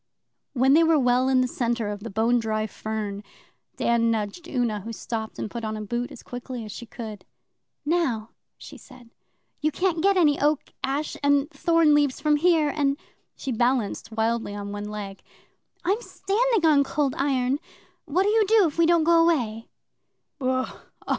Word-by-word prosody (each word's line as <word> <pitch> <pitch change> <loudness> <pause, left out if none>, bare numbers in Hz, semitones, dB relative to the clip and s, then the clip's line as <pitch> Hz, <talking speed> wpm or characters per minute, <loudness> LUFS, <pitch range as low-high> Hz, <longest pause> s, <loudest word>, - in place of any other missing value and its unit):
When 265 0 +4
they 325 +3 +6
were 325 -1 +4
well 250 -1 +3
in 260 -1 +4
the 255 - +1
centre 235 -3 -1
of 205 0 -4
the 230 +3 -7
bone 225 +4 +2
dry 215 -1 -1
fern, 210 -1 -5 0.5
Dan 235 -1 +2
nudged 225 - -3
Una, 240 -7 -1
who 220 +4 -7
stopped 220 0 -5
and - - -3
put 235 -1 -5
on 215 0 -3
a - - -5
boot 240 +3 -3
as - - -11
quickly 245 -1 -7
as 210 - -8
she 235 - -8
could. 220 -4 -8 0.6
'Now,' 270 -9 0 0.3
she - - -12
said, 250 -3 -16 0.5
'you 310 +1 +1
can't 345 +1 0
get 395 +1 +3
any 300 -5 +3
Oak, 295 0 +1
Ash, 275 +3 -2
and 285 +1 +2
Thorn 330 -3 +3
leaves 290 -3 +2
from 300 0 +2
here, 320 -2 +3
and' 280 -1 0 0.4
she 270 - -5
balanced 240 -2 0
wildly 225 -1 -1
on 200 0 -6
one 205 0 -5
leg 205 -2 -7 0.6
'I'm 400 +6 +1
standing 450 -3 0
on 290 -2 +5
Cold 280 -1 -1
Iron. 270 -1 0 0.5
What'll 370 +7 +1
you 440 -2 +3
do 435 -2 +5
if 320 0 -3
we 335 - +5
don't 340 -1 +4
go 335 +1 +5
away? 235 -9 0
255 Hz, 175 wpm, -25 LUFS, 225-310 Hz, 0.6 s, they